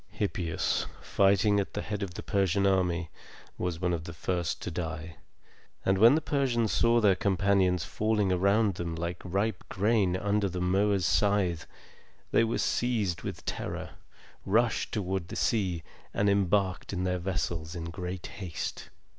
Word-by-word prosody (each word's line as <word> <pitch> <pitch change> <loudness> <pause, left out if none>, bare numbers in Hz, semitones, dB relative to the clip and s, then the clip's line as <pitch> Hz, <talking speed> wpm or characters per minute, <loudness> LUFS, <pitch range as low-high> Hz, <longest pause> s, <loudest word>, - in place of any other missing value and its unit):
Hippias, 90 -5 -1
fighting 100 +1 +3
at 100 - -3
the 105 - -2
head 105 -1 -4
of 90 -3 -4
the - - -6
Persian 100 -1 +1
army, 90 -3 +1 0.5
was 90 -2 -2
one 90 -1 0
of 80 -1 -3
the 85 - -8
first 85 +2 -2
to - - -4
die; 80 0 -5 0.7
and 95 0 +2
when 115 +6 +8
the 160 - +1
Persians 125 -8 +1
saw 120 0 +4
their 105 -4 +5
companions 95 -3 +2
falling 105 -3 0
around 100 +3 +3
them 85 -1 -4
like 85 +1 -4
ripe 100 +2 -1
grain 100 -2 +2
under 100 +1 +1
the 90 0 -4
mower's 95 +1 +2
scythe, 100 -4 +1 0.6
they - - +4
were 115 0 0
seized 110 -8 0
with - - -6
terror, - - -4 0.5
rushed 115 +4 +1
toward 95 -4 -2
the - - -7
sea, 95 -8 0 0.3
and 100 0 +3
embarked 100 -1 +1
in 90 -1 -1
their 90 0 0
vessels 85 -3 -3
in 85 - -5
great 90 +1 -5
haste. 90 -6 -6
95 Hz, 155 wpm, -29 LUFS, 90-105 Hz, 0.7 s, when